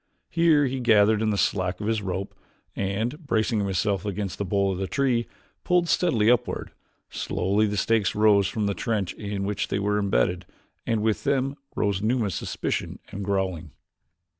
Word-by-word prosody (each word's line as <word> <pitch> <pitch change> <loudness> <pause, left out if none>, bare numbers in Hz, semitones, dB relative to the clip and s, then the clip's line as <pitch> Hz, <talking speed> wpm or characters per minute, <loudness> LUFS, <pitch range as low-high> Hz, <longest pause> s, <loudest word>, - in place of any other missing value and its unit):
Here 160 -3 +4
he 130 0 -2
gathered 110 -3 +4
in 110 - +1
the 105 - 0
slack 90 -2 0
of 105 - -4
the 110 -1 0
rope 95 +1 -3 0.4
and, 110 - -2
bracing 110 -5 +1
himself 100 0 0
against 100 -2 -4
the - - 0
bole 100 0 +1
of 95 - -4
the 95 - -2
tree, 125 -2 +1 0.4
pulled 180 -1 +2
steadily 115 -13 +2
upward. 125 0 -1 0.4
Slowly 100 +4 0
the 105 0 -2
stakes 110 0 +1
rose 105 -2 +4
from 110 -4 -2
the 100 - 0
trench 105 -5 -2
in 100 -2 -4
which 100 +1 -2
they - - -1
were 105 +1 0
imbedded 95 -3 0 0.4
and 110 -2 +1
with 110 -1 0
them 135 0 0 0.2
rose 100 -2 0
Numa's 110 -3 0
suspicion - - -3
and 100 - -5
growling. 95 -5 -2
105 Hz, 170 wpm, -25 LUFS, 100-115 Hz, 0.4 s, Here